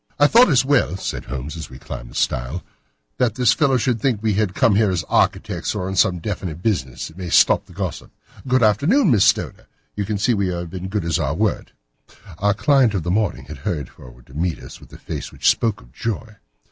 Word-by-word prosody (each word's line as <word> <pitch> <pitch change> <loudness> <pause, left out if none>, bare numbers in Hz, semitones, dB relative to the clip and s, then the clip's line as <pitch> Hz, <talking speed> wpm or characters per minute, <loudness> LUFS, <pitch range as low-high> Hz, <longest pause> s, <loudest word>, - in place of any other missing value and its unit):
"I 145 - +5
thought 235 +11 +6
it - - +1
as 130 -2 +4
well," 135 -9 +2
said - - -5
Holmes 65 +5 -6
as 80 -2 -7
we 65 - -11
climbed - - -8
the - - -14
stile, 60 +9 -1 0.6
"that 120 -4 +1
this 125 -1 +4
fellow 135 -2 +2
should 120 -2 0
think 125 -5 +1
we 110 -2 +2
had 100 -2 0
come 115 -6 +3
here 105 0 +3
as 90 -3 -1
architects, - - 0
or 90 - -3
on 95 - -4
some 95 -1 +3
definite 90 -2 -5
business. 65 - -2
It 80 - -19
may 90 -2 -5
stop - - +4
his 90 - -16
gossip. 95 -2 -5 0.4
Good 130 -1 +3
afternoon, 155 - +3
Miss 105 -5 +4
Stoner. - - 0 0.3
You 105 - -1
see 110 +5 +1
that 115 - +1
we 100 -1 0
have 85 -2 -4
been 95 -1 -6
as - - -5
good 100 -3 -2
as 85 - 0
our 75 -1 -1
word." 105 +3 -1 0.7
Our 100 0 +2
client 135 -4 +3
of 90 - -1
the 85 - -2
morning 95 - -1
had 75 0 -9
hurried 75 -1 -3
forward - - -16
to 65 - -18
meet 85 +2 -1
us - - -12
with - - -17
a - - -11
face - - -6
which - - -2
spoke 110 - -1
her - - -17
joy. 110 +4 -5
95 Hz, 235 wpm, -21 LUFS, 80-115 Hz, 0.7 s, thought